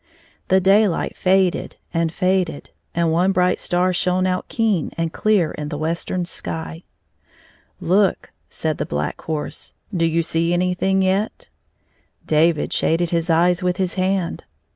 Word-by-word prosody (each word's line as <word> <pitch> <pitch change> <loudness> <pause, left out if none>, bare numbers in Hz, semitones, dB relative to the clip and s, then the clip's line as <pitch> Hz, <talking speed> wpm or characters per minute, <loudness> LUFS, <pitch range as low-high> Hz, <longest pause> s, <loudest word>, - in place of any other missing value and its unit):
The 190 - +4
daylight 195 -1 +2
faded 185 -1 +1 0.2
and 165 -1 0
faded, 185 -3 -1 0.2
and 170 -1 +2
one 180 +4 +3
bright 180 -1 +2
star 180 +1 +1
shone 180 +1 +1
out 185 0 -1
keen 215 -8 0
and 165 -1 -2
clear 205 -7 +2
in 150 -1 -5
the 150 - -4
western 170 +3 -2
sky. 80 - -6 0.5
" - - -29 0.2
Look," 190 +3 +1 0.2
said 155 -2 -3
the - - -1
Black 75 0 -3
Horse, 155 -2 -5 0.2
do 165 -1 +2
you 165 +1 +1
see 165 +1 0
anything 180 +2 +1
yetl" 200 - -1 0.8
David 160 +1 +2
shaded 165 +1 +1
his 170 0 0
eyes 175 +2 +3
with 180 0 0
his 185 -2 -1
hand. 185 -2 -1
175 Hz, 145 wpm, -21 LUFS, 165-185 Hz, 0.8 s, The